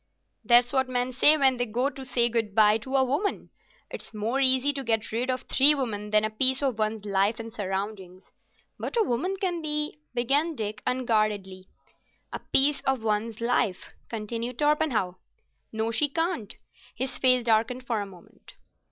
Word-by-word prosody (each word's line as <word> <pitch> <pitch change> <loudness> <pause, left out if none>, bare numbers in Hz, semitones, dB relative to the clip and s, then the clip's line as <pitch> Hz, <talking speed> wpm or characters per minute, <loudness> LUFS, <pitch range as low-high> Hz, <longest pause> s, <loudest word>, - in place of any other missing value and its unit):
"That's 245 +1 +4
what 265 -1 +1
men 250 0 -1
say 295 +5 +5
when 265 -3 +3
they 245 0 -1
go 245 +6 -1
to 270 - -9
say 245 -2 +2
good 225 -3 -2
bye 215 0 +5
to 260 +4 -5
a 265 - +4
woman. 290 +11 -2 0.4
It's - - -6
more 225 +5 -1
easy 260 +1 +3
though 280 -1 -5
to - - -10
get 225 -2 0
rid 240 +4 -2
of 255 -1 -2
three 285 +3 +5
women 210 -6 -3
than 215 0 +3
a 215 - -3
piece 260 +5 +1
of 255 -5 -1
one's 215 -1 -2
life 200 +2 0
and 230 0 -8
surroundings." 190 -2 -5 0.5
"But - - -4
a 455 - +4
woman 355 - -1
can 355 -3 -2
be——" 300 -1 -3 0.2
began 285 +7 +1
Dick, 215 -3 -5
unguardedly. 215 -6 -1 0.7
"A - - -4
piece 285 +2 +2
of 265 -4 -1
one's 220 +1 -2
life," 235 -5 -1 0.2
continued 230 +2 -5
Torpenhow. 295 -11 0 0.5
"No, 220 +1 -2
she 290 +6 +1
can't. 325 - -3 0.4
His 260 +1 -4
face 255 -1 +4
darkened 230 +3 0
for 230 -3 -1
a 200 - -5
moment. 180 -3 -17
240 Hz, 180 wpm, -26 LUFS, 215-270 Hz, 0.7 s, say